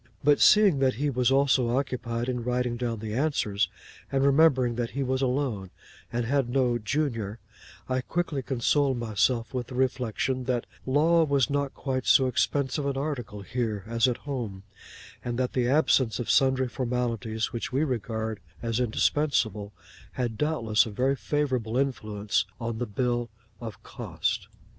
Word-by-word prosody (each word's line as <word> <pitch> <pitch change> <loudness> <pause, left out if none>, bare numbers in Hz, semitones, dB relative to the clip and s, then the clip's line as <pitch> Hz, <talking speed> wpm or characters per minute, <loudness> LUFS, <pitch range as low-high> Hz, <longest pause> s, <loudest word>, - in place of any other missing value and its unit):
But 145 0 +4
seeing 205 -9 +6
that 130 -3 +2
he 145 +4 0
was 125 -1 +2
also 130 -3 +3
occupied 125 -3 -2
in 125 -2 -2
writing 125 0 0
down 115 -3 -3
the 110 -1 -4
answers, 110 - 0 0.4
and 135 0 +2
remembering 140 -4 +4
that 120 0 -2
he 140 - +1
was 130 0 -1
alone 125 -7 -1 0.4
and 120 0 -1
had 135 0 +1
no 125 -2 +1
'junior,' 115 -4 -2 0.5
I 130 0 0
quickly 160 -1 -2
consoled 135 +1 +1
myself 115 +1 0
with 125 -2 -3
the 130 - -8
reflection 130 0 -1
that 125 -2 -1 0.2
law 160 +5 +4
was 140 -4 +2
not 140 -1 -1
quite 130 -2 -3
so 130 - +6
expensive 140 +2 0
an 140 -1 -1
article 135 -8 -4
here, 110 -2 -2
as 115 +2 +2
at 125 -1 0
home; 115 -9 -4 0.6
and 120 -1 -3
that 125 -1 -1
the 125 -2 +1
absence 130 -4 +3
of 120 - -1
sundry 130 -1 +3
formalities 115 -3 -2
which 120 - -4
we 135 +4 +1
regard 110 -5 -2 0.2
as 115 0 -1
indispensable, 110 -4 +1 0.4
had 120 -3 -2
doubtless 115 -6 +1
a - - -4
very 130 +6 +1
favourable 130 -5 -1
influence 105 -7 0
upon 115 -1 -3
the 120 - -2
bill 120 +2 -1 0.3
of 115 -3 -8
costs. - - -3
125 Hz, 155 wpm, -27 LUFS, 115-135 Hz, 0.6 s, seeing